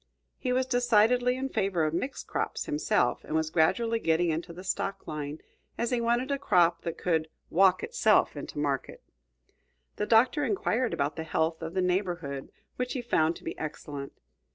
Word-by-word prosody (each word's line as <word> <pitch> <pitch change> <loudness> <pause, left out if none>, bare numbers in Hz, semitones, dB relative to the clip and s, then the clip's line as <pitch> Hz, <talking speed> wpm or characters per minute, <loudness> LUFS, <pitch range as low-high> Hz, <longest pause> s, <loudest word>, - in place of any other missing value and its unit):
He 250 - -1
was 255 +1 +2
decidedly 245 0 +3
in 270 +1 -2
favor 190 -8 0
of 155 - -1
mixed 255 +11 -3
crops, - - -2
himself, 305 -2 +1
and 155 - -4
was 160 0 0
gradually 225 +8 +2
getting 165 -2 +2
into 165 +2 -3
the 180 +2 -9
stock 195 +1 -3
line, 150 -1 -5 0.4
as 235 +1 -1
he 245 -1 +1
wanted 240 +3 +1
a 280 - 0
crop 175 -10 +3
that 170 -2 -4
could 160 -3 0 0.2
"walk 185 +1 +4
itself 480 0 +3
into - - -7
market." 140 -3 -2 0.9
The 210 - -1
Doctor 245 +5 +4
inquired 255 - 0
about 140 +3 -1
the 160 - -3
health 160 +1 -1
of 165 +2 -6
the 185 - +2
neighborhood, 175 -7 -2 0.3
which 250 0 -2
he 260 - -2
found 160 -7 +2
to - - -13
be - - -4
excellent. 145 -2 -6
185 Hz, 175 wpm, -28 LUFS, 160-245 Hz, 0.9 s, walk